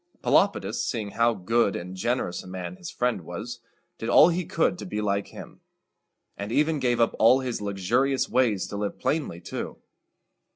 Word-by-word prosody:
Pelopidas, - - +2
seeing 105 -3 -3
how 115 +1 +2
good 110 +2 +1
and 90 +2 -6
generous 120 -2 -1
a - - -13
man 95 - -6
his 180 -3 -8
friend 125 -6 -1
was, 80 - -7 0.4
did 115 - -3
all 155 - +7
he 175 +1 -1
could 170 +1 0
to - - -6
be 105 - -3
like 100 -1 0
him, - - -11 0.7
and 100 +2 -5
even 150 +4 +2
gave 125 -2 +1
up 115 - +2
all 125 +4 +6
his 125 -4 -3
luxurious 110 +7 +1
ways 110 -7 +2
to 100 - -6
live 100 0 -3
plainly 145 - -1
too. 85 - -6
115 Hz, 175 wpm, -26 LUFS, 100-130 Hz, 0.7 s, all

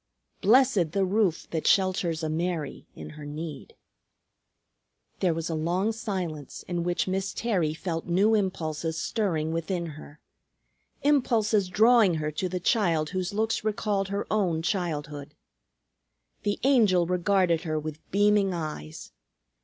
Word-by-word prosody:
"Blessed 215 - +4
the 195 -1 +2
roof 190 -3 +1
that 160 -2 -2
shelters 180 -4 +2
a - - 0
Mary 165 -2 -3
in - - -9
her 150 0 -10
need." 150 0 -7 1.4
There 180 - +2
was 165 +1 -3
a 165 - -2
long 175 +7 0
silence, 180 - -5
in 175 -1 -2
which 175 +1 -1
Miss 190 +1 -2
Terry 180 -10 0
felt 165 -1 -4
new 195 +6 +3
impulses 165 -6 -1
stirring 165 -8 -1
within 170 +2 -2
her; 150 -1 -10 0.8
impulses 225 -8 +2
drawing 220 -2 +5
her 155 -1 -2
to 180 +5 -2
the 180 +1 -3
child 170 -6 +1
whose 185 -1 -2
looks 220 +2 -1
recalled 210 -2 -1
her 200 +1 -3
own 180 -7 +1
childhood. 150 -6 -3 1.1
The 205 -1 -1
Angel 215 -10 +4
regarded 180 -1 +2
her 155 -3 -2
with 155 0 -5
beaming 205 -1 +3
eyes. 150 - -6
180 Hz, 135 wpm, -27 LUFS, 160-205 Hz, 1.4 s, drawing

